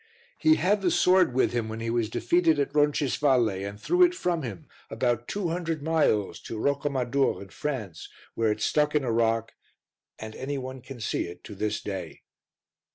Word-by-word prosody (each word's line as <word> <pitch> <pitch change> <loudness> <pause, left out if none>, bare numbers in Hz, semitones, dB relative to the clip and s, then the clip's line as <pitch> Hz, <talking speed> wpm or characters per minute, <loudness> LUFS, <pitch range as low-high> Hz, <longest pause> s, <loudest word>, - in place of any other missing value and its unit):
He 315 0 +5
had 205 - +1
the 185 - +2
sword 180 -2 +4
with 130 -2 +2
him 115 -2 -1
when 110 +1 -5
he 115 0 -2
was 115 -2 0
defeated 160 +8 +2
at 140 - -1
Roncisvalle 145 -4 +2
and 100 +1 -6
threw 355 - +1
it 355 0 +6
from 175 - -1
him, 105 - -7 0.2
about 120 -1 -1
two 200 -4 -2
hundred 165 -3 -3
miles, 150 -11 +1
to 115 - -7
Rocamadour 140 0 0
in 100 - -10
France 110 - -5 0.2
where 115 -1 +1
it 105 0 -3
stuck 150 +4 +1
in 150 - +2
a 120 - -1
rock 115 0 +1 0.6
and 110 0 -8
any 140 +2 -4
one 130 0 -6
can 130 0 -10
see 110 - -1
it 90 +1 -11
to - - -9
this 105 +1 -2
day. 95 -5 -6
130 Hz, 185 wpm, -27 LUFS, 110-150 Hz, 0.6 s, it